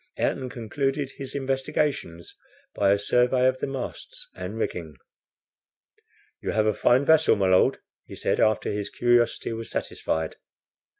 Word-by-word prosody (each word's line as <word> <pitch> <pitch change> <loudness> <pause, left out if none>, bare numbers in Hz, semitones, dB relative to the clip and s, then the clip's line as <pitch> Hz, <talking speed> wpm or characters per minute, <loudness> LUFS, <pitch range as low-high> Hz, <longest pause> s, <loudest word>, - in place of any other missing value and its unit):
Ayrton 130 -1 -1
concluded 135 +4 -2
his 135 0 -7
investigations 135 - -2 0.4
by 100 -1 +3
a 100 - +4
survey 125 +5 +2
of 130 0 +1
the - - -2
masts 135 -2 -6
and 90 +4 -6
rigging. 85 -8 -3 1.5
"You - - -2
have 110 -1 +2
a 110 - +3
fine 125 +6 +3
vessel, 160 0 +5
my 100 -2 +1
Lord," 95 - +4 0.3
he - - -9
said - - 0
after 110 -1 +2
his 105 -1 -3
curiosity 120 -1 +2
was 115 0 -6
satisfied. 80 0 -3
120 Hz, 140 wpm, -25 LUFS, 100-135 Hz, 1.5 s, vessel